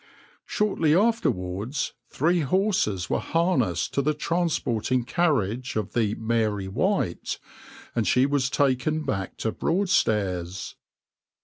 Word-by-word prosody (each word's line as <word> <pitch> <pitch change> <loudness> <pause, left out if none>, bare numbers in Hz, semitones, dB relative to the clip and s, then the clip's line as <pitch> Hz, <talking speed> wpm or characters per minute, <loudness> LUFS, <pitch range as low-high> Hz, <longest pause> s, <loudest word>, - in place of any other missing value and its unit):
\par - - -28 0.4
Shortly 165 -7 +2
afterwards 125 - 0 0.2
three 170 +5 +1
horses 165 - +1
were - - 0
harnessed 165 - 0
to 140 - +2
the 150 +2 0
transporting 145 -8 0
carriage 130 - 0
of 105 -4 -2
the 110 -3 +1
{\itshape{Mary 110 -3 0
White}}, 130 - -1 0.6
and 115 -4 +1
she 125 +7 +4
was 140 -2 +1
taken 140 +3 +1
back 95 -7 -3
to 110 - -1
Broadstairs. 105 - 0
130 Hz, 115 wpm, -25 LUFS, 105-165 Hz, 0.6 s, she